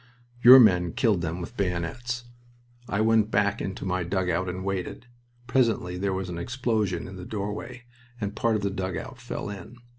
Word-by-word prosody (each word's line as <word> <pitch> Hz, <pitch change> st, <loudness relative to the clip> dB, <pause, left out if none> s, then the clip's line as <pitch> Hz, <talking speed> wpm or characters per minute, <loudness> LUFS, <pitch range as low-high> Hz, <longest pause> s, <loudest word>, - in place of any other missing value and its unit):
Your 125 Hz, +2 st, +11 dB
men 90 Hz, -7 st, +4 dB
killed 105 Hz, -7 st, +2 dB
them 80 Hz, +1 st, -3 dB
with 85 Hz, +8 st, -8 dB
bayonets. 100 Hz, +7 st, -2 dB, 0.7 s
I 100 Hz, -, 0 dB
went 110 Hz, -1 st, +3 dB
back 100 Hz, -1 st, +1 dB
into 95 Hz, 0 st, -5 dB
my 95 Hz, 0 st, 0 dB
dugout 90 Hz, 0 st, -1 dB
and 95 Hz, +1 st, -5 dB
waited. 95 Hz, +4 st, -3 dB, 0.4 s
Presently 115 Hz, -8 st, +1 dB
there 95 Hz, +2 st, -1 dB
was 95 Hz, 0 st, -3 dB
an 85 Hz, -1 st, -5 dB
explosion 110 Hz, -6 st, -1 dB
in 95 Hz, 0 st, -9 dB
the 90 Hz, -, -8 dB
doorway 105 Hz, +5 st, -5 dB, 0.4 s
and 105 Hz, -1 st, -3 dB
part 115 Hz, 0 st, +1 dB
of 105 Hz, -, -2 dB
the 100 Hz, -, 0 dB
dugout 95 Hz, -2 st, -5 dB
fell 105 Hz, -, -5 dB
in. 100 Hz, +5 st, -10 dB
100 Hz, 175 wpm, -26 LUFS, 90-115 Hz, 0.7 s, Your